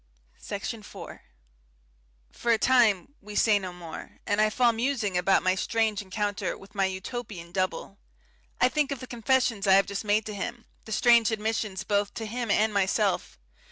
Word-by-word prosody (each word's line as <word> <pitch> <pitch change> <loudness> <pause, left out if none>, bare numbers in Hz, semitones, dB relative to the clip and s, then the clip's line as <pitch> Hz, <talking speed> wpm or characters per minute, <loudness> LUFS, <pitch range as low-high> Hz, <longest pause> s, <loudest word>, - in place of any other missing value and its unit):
Section 210 +2 -5
4 200 - -10 1.1
For 235 - -1
a 230 - +5
time 235 -4 +3
we 210 +1 -10
say 210 -2 +4
no 185 -2 -6
more, 175 -2 -9
and 205 +1 +1
I 215 - +4
fall 235 +2 +3
musing 230 -4 -1
about 180 +2 +3
my 185 - +3
strange 220 +2 0
encounter 205 +1 -3
with 195 +2 -16
my 195 -2 +1
Utopian 190 -2 -5
double. 185 +2 -3 0.6
I 250 - +5
think 295 +1 0
of 275 - -3
the 255 - -7
confessions 240 -3 +1
I 190 - +7
have 195 +1 +6
just 200 +1 -4
made 210 +1 +1
to 215 - -5
him, 235 +4 -5 0.2
the 220 - -10
strange 235 0 +5
admissions 215 -3 -2
both 205 0 0
to 225 - -4
him 235 +1 -4
and 215 +2 +2
myself. 195 -1 0
210 Hz, 175 wpm, -27 LUFS, 195-235 Hz, 1.1 s, I